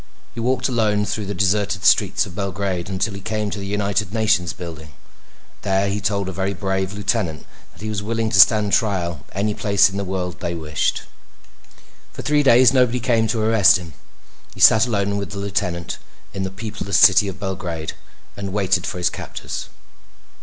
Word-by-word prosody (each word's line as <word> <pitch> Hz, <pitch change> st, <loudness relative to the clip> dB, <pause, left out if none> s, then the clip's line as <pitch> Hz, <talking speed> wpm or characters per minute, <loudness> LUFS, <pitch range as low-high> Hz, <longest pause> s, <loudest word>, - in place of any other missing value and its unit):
He -, -, -7 dB
walked 125 Hz, +3 st, 0 dB
alone 110 Hz, -5 st, +1 dB
through 105 Hz, -1 st, -3 dB
the 100 Hz, -, -4 dB
deserted 100 Hz, +1 st, 0 dB
streets -, -, +3 dB
of 95 Hz, -, -11 dB
Belgrade 95 Hz, -2 st, -3 dB
until 100 Hz, +3 st, -2 dB
he 100 Hz, -, -8 dB
came 105 Hz, +1 st, -3 dB
to 105 Hz, -, -4 dB
the 100 Hz, -, -6 dB
United 100 Hz, -1 st, -1 dB
Nations 110 Hz, -6 st, +1 dB
building. 80 Hz, -3 st, -9 dB, 0.7 s
There 100 Hz, 0 st, +1 dB
he 100 Hz, +1 st, -3 dB
told 100 Hz, -1 st, -1 dB
a -, -, -3 dB
very 95 Hz, +2 st, -2 dB
brave 95 Hz, 0 st, -2 dB
lieutenant 100 Hz, -6 st, -2 dB, 0.3 s
that -, -, -14 dB
he 110 Hz, -, -3 dB
was 105 Hz, -2 st, -2 dB
willing 115 Hz, +1 st, -2 dB
to 100 Hz, -, +3 dB
stand 105 Hz, -1 st, +6 dB
trial 85 Hz, -, 0 dB
any 105 Hz, +3 st, -1 dB
place 100 Hz, -2 st, +3 dB
in 100 Hz, -, -5 dB
the 100 Hz, -, -2 dB
world 90 Hz, -2 st, -4 dB
they 85 Hz, -1 st, -3 dB
wished. 75 Hz, -2 st, -1 dB, 1.1 s
For -, -, -7 dB
three 150 Hz, 0 st, +2 dB
days 125 Hz, -2 st, +6 dB
nobody 125 Hz, -2 st, +3 dB
came 115 Hz, -2 st, +1 dB
to 110 Hz, 0 st, -1 dB
arrest 100 Hz, -4 st, +5 dB
him. 85 Hz, -4 st, -10 dB, 0.6 s
He -, -, -12 dB
sat 110 Hz, +2 st, +6 dB
alone 100 Hz, -3 st, -1 dB
with 100 Hz, 0 st, -5 dB
the -, -, -6 dB
lieutenant 95 Hz, -4 st, -3 dB, 0.3 s
in 95 Hz, -, -4 dB
the 95 Hz, -, -2 dB
peopleless 100 Hz, -1 st, -3 dB
city 105 Hz, -, +6 dB
of 95 Hz, -, -6 dB
Belgrade 90 Hz, -5 st, -4 dB, 0.4 s
and 100 Hz, -1 st, -5 dB
waited 95 Hz, -2 st, 0 dB
for -, -, -4 dB
his 90 Hz, 0 st, 0 dB
captors. -, -, -7 dB
100 Hz, 185 wpm, -21 LUFS, 95-105 Hz, 1.1 s, stand